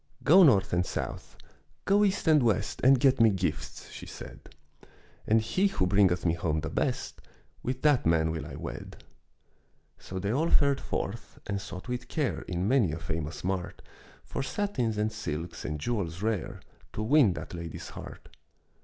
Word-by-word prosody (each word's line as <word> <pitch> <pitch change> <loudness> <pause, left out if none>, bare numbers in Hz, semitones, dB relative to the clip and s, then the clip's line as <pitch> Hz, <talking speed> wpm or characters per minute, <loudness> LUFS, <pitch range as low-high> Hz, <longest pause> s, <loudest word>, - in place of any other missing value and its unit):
"Go 175 +6 +7
north 105 - +5
and 90 0 +3
south, - - -5 0.5
go 205 +1 +4
east 200 -3 0
and 155 -2 +6
west, 110 -4 0
And 130 +1 +6
get 130 -2 +4
me 115 - +7
gifts," 80 -6 -3
she - - -9
said. - - -9 0.9
"And 110 +1 +5
he 185 - +1
who 195 - 0
bringeth 90 -2 +3
me 85 - +3
home 80 -2 -1
the - - -4
best, - - -2 0.4
With 130 +1 -4
that 145 -4 +4
man 80 -1 +2
will 80 - -4
I - - -8
wed." - - -8 1.0
So 95 - -7
they 100 +2 -1
all 155 +7 +1
fared 140 -1 +3
forth, 105 +1 -4
and 100 -1 -3
sought 95 0 -8
with 125 0 -4
care 150 -6 -1
In 90 +1 -1
many 120 - +3
a - - -3
famous 80 -1 -4
mart, 90 -1 -3 0.4
For - - -4
satins 130 - -1
and 105 +1 0
silks 85 -5 -5
and 75 0 -3
jewels 90 -2 -3
rare, 110 -6 -2 0.3
To 110 - -3
win 125 -4 +5
that 75 +1 -7
lady's 85 -2 -7
heart. - - -11
105 Hz, 170 wpm, -29 LUFS, 85-130 Hz, 1.0 s, Go